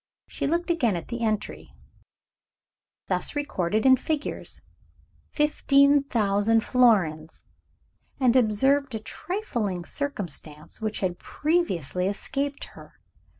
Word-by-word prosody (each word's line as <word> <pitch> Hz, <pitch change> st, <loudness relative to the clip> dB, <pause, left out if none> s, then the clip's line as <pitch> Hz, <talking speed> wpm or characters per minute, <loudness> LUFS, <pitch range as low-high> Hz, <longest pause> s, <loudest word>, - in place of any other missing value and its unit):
She -, -, -3 dB
looked 340 Hz, +3 st, 0 dB
again 245 Hz, -, +1 dB
at 170 Hz, -, -6 dB
the 235 Hz, -1 st, -4 dB
entry, 215 Hz, -2 st, -3 dB, 1.3 s
thus -, -, -2 dB
recorded 215 Hz, -7 st, -1 dB
in 260 Hz, -1 st, +7 dB
figures 295 Hz, +3 st, -4 dB, 0.7 s
"15,000 275 Hz, -8 st, +3 dB
florins" 190 Hz, -13 st, +2 dB, 0.8 s
and 255 Hz, -2 st, +3 dB
observed 260 Hz, +3 st, +2 dB
a -, -, -2 dB
trifling 215 Hz, -, -4 dB
circumstance 175 Hz, -, -5 dB
which 215 Hz, -1 st, -3 dB
had 180 Hz, -2 st, -2 dB
previously 190 Hz, -, -1 dB
escaped 275 Hz, +8 st, -3 dB
her. -, -, -15 dB
235 Hz, 100 wpm, -26 LUFS, 195-285 Hz, 1.3 s, in